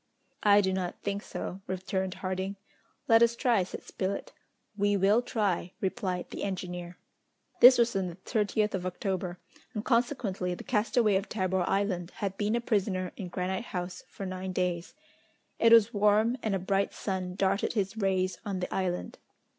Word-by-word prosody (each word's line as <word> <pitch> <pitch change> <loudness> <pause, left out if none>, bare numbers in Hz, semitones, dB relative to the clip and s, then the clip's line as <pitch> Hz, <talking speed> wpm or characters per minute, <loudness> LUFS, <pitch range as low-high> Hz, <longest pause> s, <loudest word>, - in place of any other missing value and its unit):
"I 205 -1 +6
do 190 -1 0
not 185 -2 -3
think 200 0 -2
so," 190 -2 -6
returned 190 0 -2
Harding. 190 +1 -3 0.5
"Let 225 0 +6
us 235 0 +4
try," 235 -4 +2
said 180 - -6
Spilett. 195 +1 -4 0.4
"We 205 0 +2
will 200 +5 +4
try," 200 -7 -1
replied 190 -3 -2
the - - -5
engineer. 180 -2 -4 0.6
This 255 +1 +10
was 235 -2 +2
on 190 -1 0
the 170 - -7
30th 210 +2 0
of 185 -1 -2
October, 185 -1 -3 0.4
and 210 - -3
consequently 230 -7 0
the - - -9
castaway 220 -2 +2
of 195 - -4
Tabor 185 -3 0
Island 195 -3 0
had 195 -2 -3
been 210 +2 0
a 235 - 0
prisoner 195 -5 0
in 195 - -6
Granite 185 +5 -3
House 180 -3 -5
for 195 - -7
nine 185 0 -4
days. 180 -2 -2 0.6
It 230 - +5
was 230 0 +7
warm, 210 +3 +3
and 215 -3 0
a - - +2
bright 195 +2 0
sun 185 -2 -3
darted 195 +1 +1
his 200 -2 -1
rays 185 -4 0
on 195 -3 -3
the 180 - -3
island. 180 -2 -2
195 Hz, 170 wpm, -29 LUFS, 185-210 Hz, 0.6 s, This